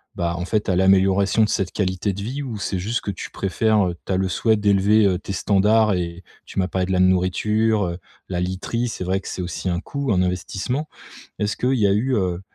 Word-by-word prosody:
bah, 85 0 -1
en 90 - -3
fait 105 +2 -1
à 90 - +2
l'amélioration 95 +3 +3
de 105 - +1
cette 95 -1 -1
qualité 95 0 -1
de 100 +1 -6
vie? 135 +6 -4
Ou 115 -5 -5
c'est 95 -2 -2
juste 110 +6 -1
que 100 - -3
tu 90 - -7
préfères 100 +1 +1
heu, 85 - -5
tu - - -4
as - - +1
le 95 0 +1
souhait 110 +4 +2
d'élever, 105 +1 +3
heu, 95 -2 +2
tes 100 - -7
standards 105 +3 +3
et 85 0 -3 0.2
tu - - -12
m'as 90 - +1
parlé 95 -1 -1
de - - -3
la 90 - +2
nourriture, 100 +4 +2
heu, 85 0 -4 0.3
la 90 -1 -2
literie 95 +6 -2
c'est 100 - -5
vrai 95 +2 0
que - - -11
c'est 90 - -4
aussi 90 +1 -4
un 85 0 0
coût, 140 +2 -3
un 90 -2 +3
investissement. 95 - -3 0.5
Est-ce 105 0 -1
qu'il 130 +2 +1
y 105 - +3
a - - +3
eu, 125 +6 +1
heu, 90 -2 -1
95 Hz, 240 wpm, -22 LUFS, 90-110 Hz, 0.5 s, l'amélioration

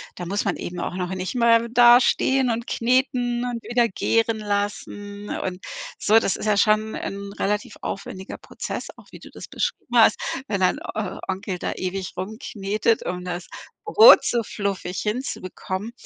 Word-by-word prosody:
da 180 - -6
muss 200 +4 -1
man 195 - 0
eben 175 0 -6
auch 180 - -3
noch 180 0 -3
nicht 185 +5 -4
mehr 235 -1 +4
da 240 0 +7
stehen 265 0 +2
und 235 +1 -2
kneten 245 0 0
und 240 -2 -3
wieder 235 +1 +2
gären 225 +2 0
lassen 205 0 -4
und 185 0 -4 0.4
so. 215 +2 +4
Das 200 - +2
ist - - -6
ja 210 -1 +3
schon 215 +1 +2
'n 200 0 -5
relativ 210 +1 -2
aufwendiger 190 -1 -6
Prozess, - - -6
auch - - -16
wie - - -11
du - - -13
das - - -10
beschrieben - - -3
hast, - - +6 0.3
wenn 200 -5 -2
dein 185 - +2
O 215 -1 -5
Onkel 190 -1 -3
da - - -2
ewig 185 0 -4
rumknetet, 210 +2 -1
um 180 0 -3
das 180 -1 -5 0.4
Brot 435 +3 +8
so 240 - +1
fluffig 195 -3 -4
hinzubekommen 210 -3 -4
210 Hz, 170 wpm, -23 LUFS, 190-235 Hz, 0.4 s, Brot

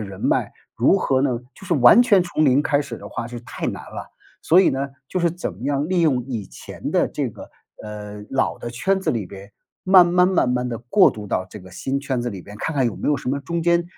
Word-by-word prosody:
人 100 -2 -8
脉， - - 0 0.2
如 125 +11 +3
何 135 -8 +1
呢 130 -3 0 0.2
就 190 - -13
是 170 - +1
完 135 - +7
全 205 -6 +4
从 175 -3 -1
零 140 -1 +4
开 145 -1 +1
始 125 -5 -6
的 100 - -11
话 115 +2 -5
是 120 0 -7
太 120 - -6
难 - - -4
了。 - - -8 0.3
所 175 +4 +5
以 - - +3
呢， 135 +1 -2 0.2
就 185 - -2
是 170 -1 +2
怎 175 - -5
么 95 +6 -14
样 140 +1 0
利 185 -1 +1
用 135 -7 +2
以 115 -6 -5
前 - - -8
的 - - +2
这 - - -3
个， - - -12 0.3
呃， 105 -1 -8
老 135 0 0
的 120 - -6
圈 190 +12 0
子 - - 0
里 110 -6 -2
边， 100 +2 -12 0.3
慢 185 -2 +7
慢 180 +1 +4
慢 185 -9 +2
慢 125 0 -1
地 115 -2 -4
过 120 - +4
渡 105 -1 -8
到 95 - -1
这 - - -9
个 95 -2 -13
新 135 +9 -2
圈 130 -4 -2
子 120 - -2
里 100 -3 -7
边。 105 +4 -12
看 160 +9 -3
看 135 -3 +2
有 115 - -2
没 - - -3
有 150 - +3
什 - - -6
么 140 +2 -1
中 170 +5 -3
间 170 0 +2
130 Hz, 280 characters per minute, -22 LUFS, 115-170 Hz, 0.3 s, 完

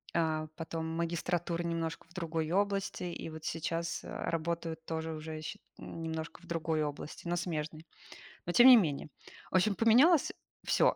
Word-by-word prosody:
а, 155 -2 +1
потом 165 0 -4
магистратуры 170 +1 -1
немножко 165 -1 -3
в - - -19
другой 165 -3 -2
области. 200 -1 0
И 170 -2 -4
вот 160 0 -9
сейчас, 165 +1 -2
э, - - -9
работаю 165 0 -2
тоже 160 0 -3
уже 155 0 -6
счи 155 - -6 0.2
немножко 160 0 -5
в 175 - -16
другой 165 -2 0
области, 150 +3 -5
но 175 - +1
смежной. 160 -2 -3 0.6
Но 175 - -1
тем 245 +7 +9
не 250 - +12
менее. 155 -8 +1 0.4
В - - +2
общем, 200 +3 +4
поменялось 255 - +6 0.3
всё. - - +4
165 Hz, 160 wpm, -32 LUFS, 160-175 Hz, 0.6 s, не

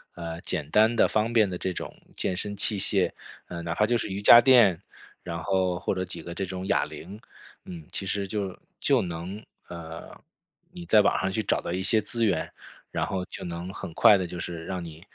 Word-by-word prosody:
呃， 85 -1 -6
简 80 -6 -4
单 110 +4 +4
的 120 - +4
方 110 +2 0
便 110 -4 +4
的 90 - -4
这 95 - -2
种 - - -6 0.2
健 90 - -2
身 100 +2 -3
器 105 +1 +2
械， 95 -1 +2 0.4
呃， 85 -1 -6
哪 85 -1 -2
怕 105 - +1
就 120 0 +2
是 105 - -3
瑜 100 +1 -4
伽 120 - +10
垫， 120 -10 +6 0.4
然 85 -1 -5
后， 95 -2 0
或 95 - -2
者 95 - -1
几 85 -2 -8
个 85 +2 -7
这 95 - -2
种 95 +1 -6
哑 - - +2
铃。 100 +5 -10 0.5
嗯， 85 -4 -9
其 100 - -3
实 100 +1 -2
就 100 -2 -3 0.3
就 - - +3
能 90 +4 -6 0.3
呃， 85 -1 -9 0.6
你 175 -1 -9
在 110 - +5
网 100 - +2
上 95 +1 -1
去 110 - -1
找 105 - 0
到 - - -5
一 90 +1 -2
些 110 +3 +3
资 115 +2 -2
源， 85 -6 0 0.4
然 - - -1
后 95 -1 -3
就 - - -9
能 85 +2 -6
很 85 - -7
快 105 - +7
地， 95 -2 -3
就 90 - -7
是 85 -1 -5
让 90 -2 -4
你， 80 -1 -10
95 Hz, 240 characters per minute, -26 LUFS, 85-105 Hz, 0.6 s, 伽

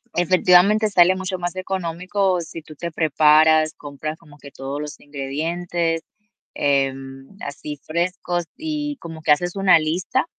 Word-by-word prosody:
efectivamente, 185 +4 +4
sale 185 -1 +5
mucho 185 0 -3
más 175 +1 -3
económico, 185 0 -1
si 165 0 -8
tú 155 0 -13
te 170 +3 -5
preparas, 155 0 +4
compras 150 +2 -6
como 150 -3 -18
que 140 - -12
todos 135 +2 -5
los 150 0 -7
ingredientes, 165 +4 -3 0.5
em, 135 +3 -1
así 145 +1 -6
frescos, 175 +1 -2
y 300 -2 -3
como 165 -1 -9
que 150 - +2
haces 175 +5 +2
una 185 -4 +5
lista 175 +11 -1
165 Hz, 140 wpm, -21 LUFS, 150-185 Hz, 0.5 s, sale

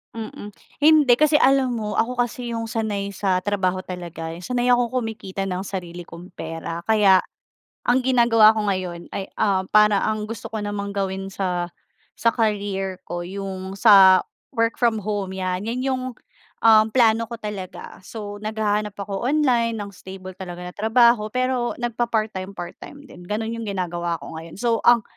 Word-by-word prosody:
Mm. 215 -2 -7 0.3
Hindi, 300 -4 +6
kasi 300 +2 +4
alam 270 -2 +4
mo, 210 -1 -3
ako 245 +2 0
kasi 240 0 -2
yung 230 -1 -3
sanay 205 -3 -3
sa 185 -1 +1
trabaho 190 -1 0
talaga, 175 -3 -7
yung 175 - -11
sanay 245 +3 -1
akong 245 -1 +3
kumikita 195 -4 -4
ng 185 0 -3
sarili 175 -3 -6
kong 170 +1 -11
pera. 165 +1 -5
Kaya, 200 -3 +5 0.6
ang 245 +2 +3
ginagawa 235 -4 +6
ko 215 -2 -1
ngayon 180 -3 -3
ay, 195 - -3
ah, 190 -2 +1
para 210 -1 +6
ang 215 0 -2
gusto 225 -2 -7
ko 220 - -2
namang 205 -1 -4
gawin 195 -1 -3
sa, 180 -3 -2 0.4
sa 230 - +2
career 200 -4 -1
ko, 175 -1 -5
yung 190 0 -6
sa 195 -3 +7 0.3
work 230 -2 +1
from 230 -3 +1
home, 200 -2 -3
'yan, 185 +1 -2
'yan 240 +3 -2
yung, 260 -1 -1 0.6
um, 220 -1 +7
plano 230 -2 +4
ko 235 +1 -7
talaga. 205 -3 -7
So, 205 -1 -7
naghahanap 210 -1 -1
ako 200 +2 -4
online 250 -5 +2
ng 205 -1 -5
stable 185 -1 -10
talaga 180 -2 -7
na - - -13
trabaho, 225 0 +3
pero 255 -1 0
nagpa-part 235 -2 0
time 190 +1 -6
part-time 285 +10 -9
din. 175 0 -13
Gano'n 220 +4 -3
yung 230 - -5
ginagawa 175 -4 -2
ko 160 - -8
ngayon, 165 0 -9
so 230 +1 +1
ang 240 -1 +6
205 Hz, 165 wpm, -23 LUFS, 190-230 Hz, 0.6 s, sa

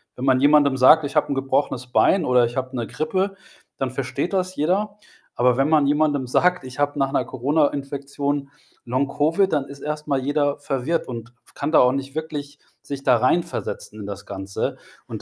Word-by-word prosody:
wenn 125 - -4
man 130 -1 +3
jemandem 145 -1 +5
sagt: 150 +4 +6
„Ich 145 - -6
habe 150 - +2
'n - - 0
gebrochenes 135 -1 -1
Bein“, 170 +7 +3
oder 125 -1 +4
„Ich 120 +2 -6
habe 130 0 -3
'ne 120 -2 -3
Grippe“, 190 +5 -2 0.4
dann 130 -2 -2
versteht 135 +7 -3
das 185 -1 -1
jeder. 200 +7 0 0.4
Aber 125 0 +3
wenn 135 +2 +2
man 155 -2 +4
jemandem 145 -2 +1
sagt: 180 +5 +2
„Ich 130 +2 -9
habe 145 0 0
nach 135 0 +1
'ner 130 - +1
Corona-Infektion 140 +1 -1 0.4
Long-Covid“, 145 +9 +1
dann 140 -3 +1
ist 140 0 -11
erst 150 0 -4
mal 140 -2 +1
jeder 145 +1 0
verwirrt 145 +4 -2
und 120 -1 -7 0.2
kann 145 +2 -2
da - - +6
auch 125 - +5
nicht 135 +1 -5
wirklich 145 -2 -5 0.2
sich 140 -1 -6
da 125 -3 +4
reinversetzen 125 -5 -1
in 100 - -7
das 100 -1 -7
Ganze. 95 0 -4 0.3
Und - - -7
140 Hz, 190 wpm, -22 LUFS, 130-150 Hz, 0.4 s, sagt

